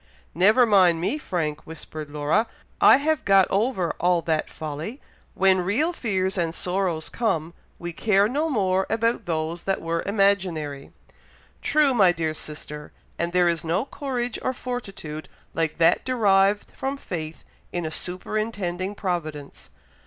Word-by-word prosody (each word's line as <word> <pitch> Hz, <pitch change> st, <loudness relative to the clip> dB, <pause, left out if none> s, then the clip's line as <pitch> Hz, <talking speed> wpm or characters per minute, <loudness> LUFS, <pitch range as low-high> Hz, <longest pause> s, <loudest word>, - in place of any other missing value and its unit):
"Never 210 Hz, -, +5 dB
mind 185 Hz, -6 st, +5 dB
me, 235 Hz, -, -1 dB
Frank!" 155 Hz, -, -2 dB
whispered 155 Hz, -1 st, -8 dB
Laura. 150 Hz, +9 st, +1 dB, 0.4 s
"I -, -, +9 dB
have 310 Hz, +1 st, 0 dB
got 195 Hz, -1 st, +5 dB
over 195 Hz, -4 st, +1 dB
all 175 Hz, -1 st, +2 dB
that 160 Hz, -1 st, 0 dB
folly. 155 Hz, -, -6 dB, 0.4 s
When 190 Hz, 0 st, +4 dB
real 250 Hz, -, +1 dB
fears 190 Hz, -, -1 dB
and 165 Hz, -1 st, -1 dB
sorrows 180 Hz, -3 st, -1 dB
come, 170 Hz, -8 st, -1 dB, 0.2 s
we 175 Hz, 0 st, -6 dB
care 205 Hz, +2 st, +3 dB
no 295 Hz, +7 st, -1 dB
more 190 Hz, -7 st, +1 dB
about 230 Hz, 0 st, 0 dB
those 160 Hz, +1 st, -2 dB
that 195 Hz, -, 0 dB
were 165 Hz, 0 st, -2 dB
imaginary." 185 Hz, -9 st, 0 dB, 0.7 s
"True, 300 Hz, -3 st, +3 dB
my 195 Hz, -7 st, +5 dB
dear 160 Hz, -2 st, -2 dB
sister; 150 Hz, -1 st, -8 dB, 0.3 s
and 170 Hz, 0 st, -1 dB
there 180 Hz, 0 st, +3 dB
is 170 Hz, -2 st, 0 dB
no 175 Hz, +8 st, 0 dB
courage 250 Hz, -5 st, -3 dB
or 255 Hz, -, -1 dB
fortitude 195 Hz, -12 st, -6 dB, 0.2 s
like 160 Hz, -2 st, -1 dB
that 165 Hz, -1 st, +4 dB
derived 205 Hz, -5 st, +2 dB
from 270 Hz, +1 st, -4 dB
faith 160 Hz, -, -6 dB, 0.3 s
in 175 Hz, -2 st, -3 dB
a 155 Hz, -, -3 dB
superintending 185 Hz, +1 st, -3 dB
providence. 155 Hz, -7 st, -4 dB
185 Hz, 145 wpm, -24 LUFS, 165-215 Hz, 0.7 s, I